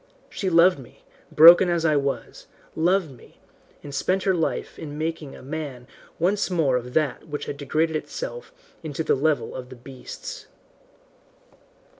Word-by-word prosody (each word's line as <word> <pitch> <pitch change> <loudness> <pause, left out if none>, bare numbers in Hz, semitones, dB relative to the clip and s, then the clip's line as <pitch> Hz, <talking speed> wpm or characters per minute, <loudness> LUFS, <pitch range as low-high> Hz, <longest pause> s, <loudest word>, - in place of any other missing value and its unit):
She 190 - -2
loved 170 -1 +5
me, 125 - -15 0.3
broken 170 +3 +8
as 170 -1 0
I 155 -2 +3
was, 140 -5 -3 0.3
loved 175 0 +1
me, 125 - -17 0.5
and 145 - -9
spent 185 +7 0
her 190 - +2
life 165 -3 -2
in 150 -2 -7
making 160 -2 -4
a - - -13
man 140 -3 -6 0.3
once 195 +5 +1
more 160 -8 +1
of 125 0 -4
that 155 -1 0
which 145 -1 -5
had - - -5
degraded 155 +3 -1
itself 485 - -6 0.3
to 155 0 -4
the - - +2
level 150 +2 0
of 125 -1 -8
the 130 - -10
beasts. 130 +1 -9
155 Hz, 155 wpm, -24 LUFS, 140-170 Hz, 0.5 s, broken